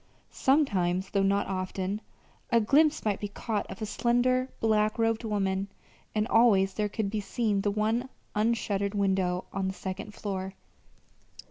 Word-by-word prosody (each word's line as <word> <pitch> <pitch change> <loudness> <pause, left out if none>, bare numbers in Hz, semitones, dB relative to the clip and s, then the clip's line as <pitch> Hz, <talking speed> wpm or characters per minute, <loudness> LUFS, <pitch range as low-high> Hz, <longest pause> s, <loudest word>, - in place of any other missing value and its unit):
Sometimes, 190 - +1
though 200 - +2
not 200 +1 +2
often, 190 +2 -3 0.5
a 235 - +4
glimpse 290 +7 +3
might 205 -2 +1
be 205 - -3
caught 210 +1 -3
of 225 - -6
a - - 0
slender, 250 +4 +1
black 215 0 +2
robed 225 0 +1
woman, 195 -3 -1 0.5
and 215 +1 +1
always 200 -6 +4
there 210 0 -1
could 200 -1 -2
be 215 - -1
seen 205 0 0
the 205 - +1
one 220 +5 0 0.2
unshuttered 210 -2 0
window 190 -2 +1
on 195 -1 -1
the 190 - -3
second 195 +3 -6
floor. 190 -2 -4
210 Hz, 150 wpm, -28 LUFS, 195-225 Hz, 0.5 s, a